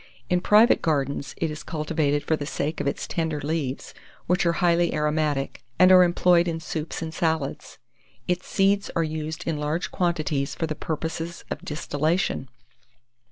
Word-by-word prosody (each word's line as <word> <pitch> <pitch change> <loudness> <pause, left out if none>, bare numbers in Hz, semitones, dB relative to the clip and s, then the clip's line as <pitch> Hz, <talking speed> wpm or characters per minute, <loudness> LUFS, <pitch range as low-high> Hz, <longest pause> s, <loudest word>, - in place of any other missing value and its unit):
In 180 0 +3
private 210 +5 +5
gardens, 140 -2 -1
it 165 -2 -1
is 150 - -7
cultivated 150 -2 -1
for 160 - +1
the 145 -2 -5
sake 155 +1 -2
of - - -2
its 140 - -2
tender 160 -3 -2
leaves, 145 -2 -3 0.3
which 180 0 +2
are 170 - +3
highly 170 -1 +2
aromatic, 150 -2 -1
and 185 +1 +7
are 185 -1 +9
employed 175 0 +3
in 165 -1 -2
soups 160 +1 -4
and 160 -1 -5
salads. 160 -5 -2 0.5
Its 180 0 -1
seeds 200 +1 +2
are 165 - +2
used 155 0 -4
in 160 -3 -1
large 150 +4 -2
quantities 155 -6 -1
for 165 - -1
the 155 - -3
purposes 160 +2 -4
of - - -4
distillation. 150 -1 -1
160 Hz, 160 wpm, -25 LUFS, 150-170 Hz, 0.5 s, are